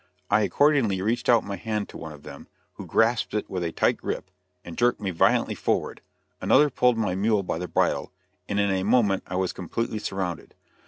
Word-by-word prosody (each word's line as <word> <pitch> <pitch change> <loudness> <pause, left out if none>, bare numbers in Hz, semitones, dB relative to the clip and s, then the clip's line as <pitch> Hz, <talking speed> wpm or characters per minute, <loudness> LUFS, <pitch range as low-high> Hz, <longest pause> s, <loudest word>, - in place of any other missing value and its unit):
I 105 +1 +4
accordingly 115 - +2
reached 115 +4 -1
out 120 -2 +5
my 100 -1 -5
hand 105 +2 -3
to - - -9
one 80 -1 -7
of 75 -1 -13
them, - - -11 0.3
who - - -9
grasped 115 -1 +1
it 105 - -1
with 90 -2 -3
a 85 - -2
tight - - +1
grip, 95 - -5 0.3
and 85 - -8
jerked 120 0 +2
me 100 -3 -2
violently 85 - +2
forward; - - -2 0.4
another 145 +2 +4
pulled 125 -1 +2
my 105 -5 0
mule 100 +2 +1
by 85 - -3
the 90 - -4
bridle, - - 0 0.4
and 100 - 0
in 100 -1 +2
a 95 -1 0
moment 105 -2 +2
I 90 - -5
was 95 0 -1
completely 110 +5 -3
surrounded. 95 -5 -4
100 Hz, 205 wpm, -25 LUFS, 95-115 Hz, 0.4 s, out